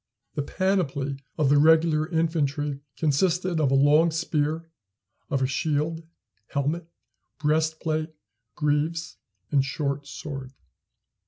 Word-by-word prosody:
The 145 - -1
panoply 145 -6 0 0.2
of 150 -4 +3
the 145 - +6
regular 160 0 +4
infantry 150 -4 0 0.2
consisted 170 +3 +1
of 145 -4 +3
a 135 - +3
long 150 +4 +5
spear, 160 0 -1 0.6
of 135 -4 +1
a - - +4
shield, 155 +4 -1 0.5
helmet, 150 +4 -1 0.5
breastplate, 155 +1 0 0.5
greaves, 155 +2 -1 0.3
and 140 -2 +4
short 140 0 -2
sword. 135 -2 -7
155 Hz, 105 wpm, -26 LUFS, 145-160 Hz, 0.6 s, the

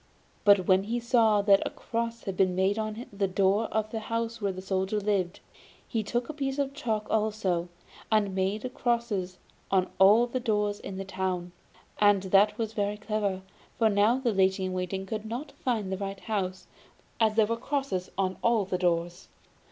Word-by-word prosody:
But 200 -3 +6
when 190 +1 +3
he 235 +3 -1
saw 230 -4 +3
that 200 -1 +5
a - - -2
cross 230 0 -4
had 195 - -4
been 185 -1 +2
made 190 +3 +1
on 215 +2 -4
the 200 0 0
door 195 +3 +2
of 215 0 -2
the 225 - -2
house 230 +1 -3
where 200 -1 0
the 185 - -7
Soldier 190 +2 -1
lived, 195 -3 -1 0.5
he 225 - -1
took 235 +3 -2
a 310 - -5
piece 275 -2 -3
of 275 -1 -1
chalk 220 -6 -2
also, 205 -5 0 0.4
and 210 -3 +2
made 205 +6 -1
crosses 225 -7 -1 0.3
on 190 -1 +1
all 210 +5 +7
the 245 +1 -3
doors 210 -4 0
in 190 - -7
the 195 - -4
town; 185 -2 -3 0.5
and 205 -2 +4
that 195 +2 +4
was 225 -1 -3
very 205 -1 -1
clever, 210 -3 -2 0.3
for 225 -2 +4
now 210 +4 +3
the 250 -4 0
lady 190 0 +2
in 185 - -3
waiting 185 +1 -3
could 215 +2 -4
not 255 +6 -5
find 220 -7 -2
the 190 - -1
right 195 -1 -5
house, 190 -4 -3 0.5
as 220 -2 +3
there 220 -1 +5
were 230 +2 -1
crosses 255 -7 -2
on 190 -1 0
all 230 -4 +2
the 185 -1 -2
doors. 175 0 -1
205 Hz, 190 wpm, -28 LUFS, 190-225 Hz, 0.5 s, all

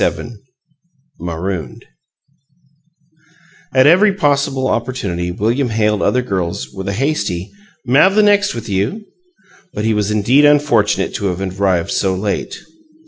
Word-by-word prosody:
XXVII - - -2 0.9
MAROONED 85 0 -5 1.9
At 130 0 +4
every 185 +7 +5
possible 140 -5 0
opportunity 105 -9 -2
William 115 +8 -1
hailed 105 -2 0
other 125 0 +1
girls 90 - -3
with 95 0 -7
a 100 - -1
hasty 100 - -2 0.4
"M'av 150 +10 +4
the 215 - +5
next 205 0 +3
'thyou?" 115 - -3 0.7
but 105 - -2
he 110 - +2
was 105 -1 0
indeed 110 +7 +3
unfortunate 145 -8 +2
to 100 - -4
have 90 -1 -3 0.2
arrived 90 -4 +1
so 95 -2 0
late. 100 +2 -4
110 Hz, 125 wpm, -17 LUFS, 95-140 Hz, 1.9 s, every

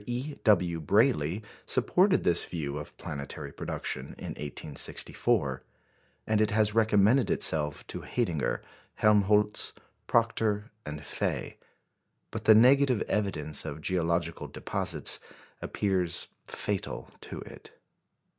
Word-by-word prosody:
E. 125 +5 -3
W. 90 -7 +3
Brayley 80 +5 +2 0.2
supported 190 +1 +3
this 85 - +3
view 75 -4 -4
of 75 - -10
planetary 70 -1 -6
production 65 +2 -5
in - - -7
1864, 75 0 -2 0.6
and 110 0 +2
it 110 - +3
has 105 -1 +2
recommended 110 +3 +4
itself 75 -2 +2
to - - -7
Haidinger, 85 - -1 0.3
Helmholtz, 105 0 +3 0.3
Proctor, 110 -2 +1 0.2
and 75 0 -6
Faye. - - -3 0.7
But - - -6
the 110 - +8
negative 130 +1 +5
evidence 80 -8 -1
of 80 -1 -6
geological 85 -1 -1
deposits - - +1 0.4
appears 90 -4 +1 0.2
fatal 105 -2 -3
to - - -7
it. - - -13
100 Hz, 110 wpm, -29 LUFS, 80-110 Hz, 0.7 s, the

